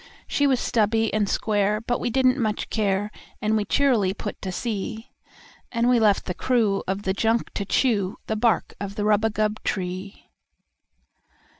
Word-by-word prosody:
She 285 Hz, -, +1 dB
was 260 Hz, -3 st, +2 dB
stubby 225 Hz, -1 st, +1 dB
and 210 Hz, -2 st, +1 dB
square, 210 Hz, -1 st, +1 dB
but 240 Hz, +2 st, -2 dB
we -, -, -1 dB
didn't 260 Hz, +2 st, +3 dB
much 215 Hz, -3 st, -2 dB
care, 205 Hz, -1 st, 0 dB, 0.3 s
And 215 Hz, +1 st, +1 dB
we 210 Hz, -1 st, +1 dB
cheerily 230 Hz, -10 st, +2 dB
put 205 Hz, 0 st, -6 dB
to 190 Hz, -, -4 dB
sea; 220 Hz, +3 st, -4 dB, 0.6 s
And 235 Hz, 0 st, +1 dB
we 245 Hz, -1 st, +4 dB
left 210 Hz, -3 st, +3 dB
the 180 Hz, -, -2 dB
crew 220 Hz, -2 st, +1 dB
of 195 Hz, +2 st, -2 dB
the 190 Hz, -, 0 dB
junk 225 Hz, +3 st, 0 dB
to 200 Hz, -, -3 dB
chew 205 Hz, -4 st, +1 dB
The 220 Hz, -, -2 dB
bark 225 Hz, +1 st, +1 dB
of 200 Hz, 0 st, -5 dB
the 205 Hz, -, -2 dB
rubagub 215 Hz, 0 st, +1 dB
tree. 185 Hz, +1 st, -4 dB
215 Hz, 165 wpm, -24 LUFS, 200-230 Hz, 0.6 s, we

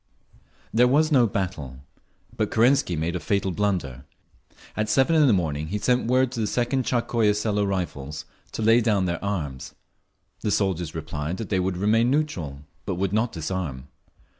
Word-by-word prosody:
There 120 Hz, +3 st, +5 dB
was 155 Hz, +5 st, +3 dB
no 125 Hz, -5 st, +5 dB
battle. 75 Hz, -, -4 dB, 0.5 s
But -, -, -1 dB
Kerensky 120 Hz, -, +3 dB
made 80 Hz, +3 st, -2 dB
a -, -, -1 dB
fatal 100 Hz, +1 st, 0 dB
blunder. 90 Hz, -10 st, -2 dB, 0.7 s
At 110 Hz, 0 st, -1 dB
seven 135 Hz, +7 st, +3 dB
in 155 Hz, -2 st, +5 dB
the -, -, +5 dB
morning 80 Hz, -6 st, 0 dB
he 105 Hz, -, -2 dB
sent 125 Hz, +3 st, +1 dB
word 130 Hz, +1 st, +2 dB
to 125 Hz, -, -5 dB
the 110 Hz, -, 0 dB
Second 125 Hz, +3 st, 0 dB
Tsarskoye 115 Hz, -4 st, +1 dB
Selo 105 Hz, -1 st, 0 dB
Rifles 80 Hz, -7 st, -3 dB, 0.3 s
to 110 Hz, -, -3 dB
lay 115 Hz, +2 st, +5 dB
down 105 Hz, -5 st, +2 dB
their 85 Hz, 0 st, -3 dB
arms. 80 Hz, -10 st, -4 dB, 0.6 s
The -, -, -2 dB
soldiers 90 Hz, -5 st, -1 dB
replied 80 Hz, +1 st, -4 dB
that 110 Hz, -, -6 dB
they 95 Hz, -, +1 dB
would 90 Hz, 0 st, -1 dB
remain 110 Hz, +5 st, +3 dB
neutral, 90 Hz, -, -2 dB, 0.2 s
but -, -, -3 dB
would 95 Hz, +2 st, -1 dB
not 110 Hz, +2 st, +1 dB
disarm. 75 Hz, -5 st, -4 dB
100 Hz, 170 wpm, -25 LUFS, 85-115 Hz, 0.7 s, There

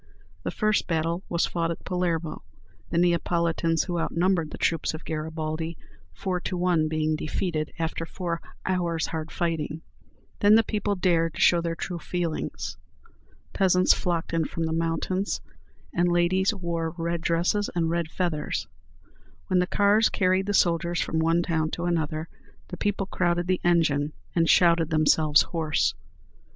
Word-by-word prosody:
The -, -, -3 dB
first 215 Hz, -1 st, +1 dB
battle 165 Hz, +1 st, 0 dB
was 170 Hz, -1 st, +1 dB
fought 170 Hz, -1 st, -1 dB
at 170 Hz, -, -5 dB
Palermo, 175 Hz, -3 st, -2 dB, 0.5 s
the 170 Hz, -, -1 dB
Neapolitans 170 Hz, -1 st, +1 dB
who 175 Hz, -2 st, -2 dB
outnumbered 170 Hz, -1 st, +1 dB
the -, -, -8 dB
troops 165 Hz, -1 st, 0 dB
of 160 Hz, -, -10 dB
Garibaldi 160 Hz, +1 st, -3 dB, 0.3 s
four 185 Hz, -2 st, -2 dB
to 180 Hz, +1 st, -3 dB
one 175 Hz, -3 st, +2 dB
being 155 Hz, 0 st, 0 dB
defeated 155 Hz, 0 st, -2 dB
after 165 Hz, 0 st, -2 dB
four 170 Hz, -2 st, -4 dB, 0.2 s
hours' 170 Hz, -3 st, 0 dB
hard 160 Hz, 0 st, -4 dB
fighting. 160 Hz, -2 st, -2 dB, 0.6 s
Then 205 Hz, +1 st, +6 dB
the 225 Hz, -, +5 dB
people 205 Hz, -2 st, -1 dB
dared 165 Hz, -3 st, +1 dB
to -, -, -7 dB
show 170 Hz, -1 st, +5 dB
their 165 Hz, 0 st, -2 dB
true 175 Hz, +1 st, -4 dB
feelings. 170 Hz, -1 st, -3 dB, 0.8 s
Peasants 185 Hz, -1 st, +4 dB
flocked 170 Hz, -2 st, -2 dB
in 165 Hz, -1 st, +1 dB
from 165 Hz, -, -3 dB
the 160 Hz, 0 st, -1 dB
mountains, 165 Hz, +4 st, -1 dB, 0.5 s
and 175 Hz, 0 st, +2 dB
ladies 185 Hz, +3 st, +3 dB
wore 170 Hz, -4 st, -3 dB
red 170 Hz, 0 st, -2 dB
dresses 175 Hz, +5 st, +1 dB
and 170 Hz, -2 st, +1 dB
red 170 Hz, -1 st, -1 dB
feathers. 165 Hz, -4 st, -2 dB, 0.8 s
When 185 Hz, -, +3 dB
the 180 Hz, -, +1 dB
cars 205 Hz, +3 st, +4 dB
carried 185 Hz, 0 st, +1 dB
the 205 Hz, -, 0 dB
soldiers 170 Hz, -1 st, +2 dB
from 160 Hz, -, -1 dB
one 165 Hz, +2 st, +2 dB
town 160 Hz, -2 st, 0 dB
to 175 Hz, -, -3 dB
another, 160 Hz, -2 st, -1 dB, 0.4 s
the 180 Hz, -, -6 dB
people 205 Hz, -1 st, -1 dB
crowded 175 Hz, -2 st, 0 dB
the 185 Hz, 0 st, 0 dB
engine, 155 Hz, -4 st, +2 dB, 0.2 s
and 165 Hz, -1 st, +3 dB
shouted 170 Hz, -2 st, +5 dB
themselves 155 Hz, -1 st, +4 dB
hoarse. 160 Hz, -3 st, 0 dB
170 Hz, 155 wpm, -26 LUFS, 160-180 Hz, 0.8 s, Then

